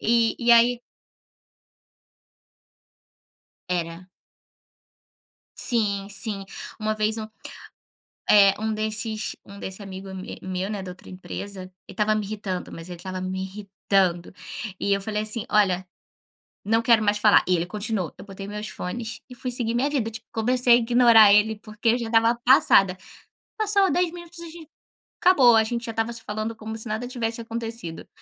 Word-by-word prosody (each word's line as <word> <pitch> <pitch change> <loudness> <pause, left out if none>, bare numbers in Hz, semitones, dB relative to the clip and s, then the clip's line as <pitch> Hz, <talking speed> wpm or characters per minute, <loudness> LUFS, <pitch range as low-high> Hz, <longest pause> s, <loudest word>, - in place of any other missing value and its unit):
E 230 0 +3
e 240 0 +2
aí 235 +1 +5 2.9
Era. 175 0 -3 1.5
Sim, 205 -5 0
sim. 205 -1 -4 0.4
Uma 215 0 0
vez 215 +1 0
um 215 0 -5 1.0
eh, 200 -2 +7
um 220 0 -1
desses 215 0 -2
um 200 0 -12
desse 190 +2 -5
amigo 195 0 -8
me 190 0 -8
meu, 185 +1 -3
né, 205 -2 -4
da 185 - -7
outra 180 - -14
empresa, 190 +1 -7
ele 185 - -12 0.2
estava 215 +1 +1
me 215 -1 -2
irritando, 195 -3 -5
mas 165 +1 -9
ele 175 -1 -8
estava 185 +2 -6
me 185 0 -4
irritando 190 -2 -1 0.5
e 200 - +1
eu 195 - -1
falei 210 +1 -2
assim: 215 +1 0
"Olha, 190 -4 +2 0.8
não 225 +3 +2
quero 230 -1 +4
mais 205 0 +2
falar". 210 -1 +5
E 180 -1 +3
ele 170 - -2
continuou. 205 -3 -2
Eu - - -11
botei 195 -1 -9
meus 210 +1 -5
fones 220 +5 -5
e 250 - -11
fui 250 +1 -5
seguir 235 -2 -2
minha 265 +4 +1
vida, 250 -6 -1
tipo, 220 0 -7
comecei 245 +2 +3
a - - +8
ignorar 235 -3 +6
ele, 210 +1 +4
porque 215 +1 -2
eu 240 - +2
já 235 - -4
estava 225 +1 +3
passada. 195 -7 +5 0.6
Passou 405 -3 +3
10 355 -1 +1
minutos, 345 -1 -10
a 340 - -7
gen 325 -1 -12 0.5
acabou, 270 -10 +6
a 220 - +5
gente 235 +1 -3
já 230 - -4
estava 225 +1 -2
se 230 - -5
falando 215 +2 -4
como 220 0 -7
se 225 - -5
nada 220 +2 -3
tivesse 235 -2 -3
acontecido. 225 -7 -6
215 Hz, 165 wpm, -24 LUFS, 195-235 Hz, 2.9 s, a